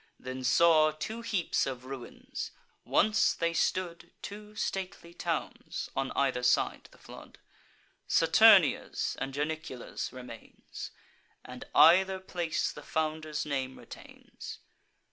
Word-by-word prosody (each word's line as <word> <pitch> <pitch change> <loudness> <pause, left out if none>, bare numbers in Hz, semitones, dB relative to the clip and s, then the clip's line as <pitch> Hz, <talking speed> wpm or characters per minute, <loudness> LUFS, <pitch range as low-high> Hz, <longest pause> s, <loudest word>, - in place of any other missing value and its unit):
Then 130 0 -6
saw 155 +3 +5
two 215 +9 -5
heaps 200 -11 0
of 130 -1 -5
ruins, 190 - -7 0.4
(once 215 0 +3
they 170 0 0
stood 170 +1 -1
Two 210 +1 -9
stately 185 -4 -4
towns, - - -4
on 135 0 -1
either 130 -3 +1
side 125 0 +1
the - - -19
flood,) - - -13 0.7
Saturnia's - - +5
and 135 0 -2
Janiculum's 150 -3 -4
remains; 125 -3 -10 0.6
And 125 0 -9
either 190 +4 +6
place 175 -3 -2
the - - -10
founder's 155 -1 -2
name 135 -3 -3
retains. - - -11
155 Hz, 110 wpm, -30 LUFS, 130-185 Hz, 0.7 s, either